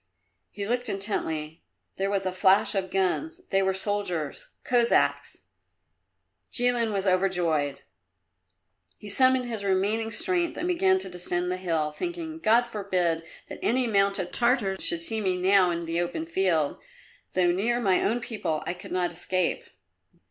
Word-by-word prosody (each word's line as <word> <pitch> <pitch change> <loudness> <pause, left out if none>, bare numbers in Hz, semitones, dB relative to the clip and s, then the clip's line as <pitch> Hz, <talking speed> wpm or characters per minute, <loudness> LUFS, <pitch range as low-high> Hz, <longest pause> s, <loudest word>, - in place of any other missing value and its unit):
He 200 -1 -6
looked 245 +1 -1
intently; 160 -6 -3 0.3
there 195 +1 0
was 195 -1 -1
a 185 - 0
flash 190 +2 +3
of 190 -2 -1
guns 195 - -1
they 195 -1 +3
were 190 0 +1
soldiers, 190 -7 -2 0.2
Cossacks! 240 -1 +2 1.1
Jilin 240 -2 +2
was 195 -1 -2
overjoyed. 175 -7 +1 1.2
He 210 - -11
summoned 255 +4 +4
his 225 -4 -3
remaining 200 +4 +1
strength 345 - -1
and 350 - -2
began 375 +2 +3
to 380 - -3
descend 180 0 -2
the 185 - -1
hill, 165 -4 -1
thinking, 330 - -5
"God 230 -2 +4
forbid 185 -7 -1 0.3
that - - -9
any 250 +3 +1
mounted 195 -4 +1
Tartar 235 -5 +2
should 170 0 -1
see 220 +5 0
me 185 -3 0
now 185 0 +4
in 170 0 -2
the 165 +1 -1
open 320 - -3
field; 180 - 0 0.5
though 180 -1 +3
near 225 +7 +1
my 195 -6 +2
own 235 +3 0
people, 175 -10 -3
I - - -2
could 180 - -11
not 180 -1 0
escape." 180 +1 -1
195 Hz, 150 wpm, -26 LUFS, 180-235 Hz, 1.2 s, summoned